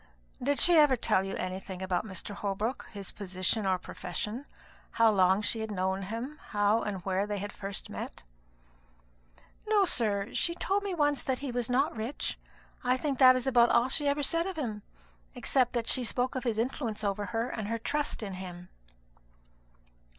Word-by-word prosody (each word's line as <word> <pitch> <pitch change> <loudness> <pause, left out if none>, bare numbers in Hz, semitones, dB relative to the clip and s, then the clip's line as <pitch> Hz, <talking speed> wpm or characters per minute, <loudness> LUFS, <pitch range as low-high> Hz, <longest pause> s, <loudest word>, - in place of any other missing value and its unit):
"Did 285 +3 +1
she 345 -1 +7
ever 295 -3 +6
tell 190 -5 +2
you 195 - -4
anything 185 0 -5
about 185 +3 -1
Mr. 190 +1 -5
Holbrook 210 +5 -3
his 200 -3 -6
position 195 +1 -1
or 185 -1 +2
profession? 210 +9 -5 0.5
how 230 -1 +5
long 190 0 +3
she 225 +3 +1
had 220 0 -3
known 190 -1 -1
him? 230 +9 -5
how 205 +2 +2
and 195 -4 -4
where 195 +1 0
they 205 -1 -2
had 205 +1 -5
first 195 -1 -5
met?" - - -7 1.4
"No, 420 -2 +4
sir. 210 - +1
She 340 - +1
told 390 +3 0
me 400 -3 -3
once 290 -3 +2
that 260 -1 -1
he 265 - -3
was 245 -1 -2
not 270 +4 +1
rich; 225 +5 -4 0.4
I 250 +1 +2
think 275 -1 -2
that 255 -1 +8
is 255 - -1
about 240 -3 +5
all 245 +2 +3
she 290 +2 +2
ever 285 +1 +1
said 335 +5 +1
of 380 - -4
him, 220 -8 -3 0.5
except 255 -2 +1
when 235 - +1
she 250 +2 +5
spoke 250 +2 0
of 260 -2 -4
his 230 -3 0
influence 230 -2 -2
over 200 0 -1
her, 230 +1 -1
and 215 -3 -4
her 230 +1 -1
trust 290 +1 -2
in 195 -2 -5
him." 180 -1 -8
225 Hz, 185 wpm, -30 LUFS, 195-260 Hz, 1.4 s, that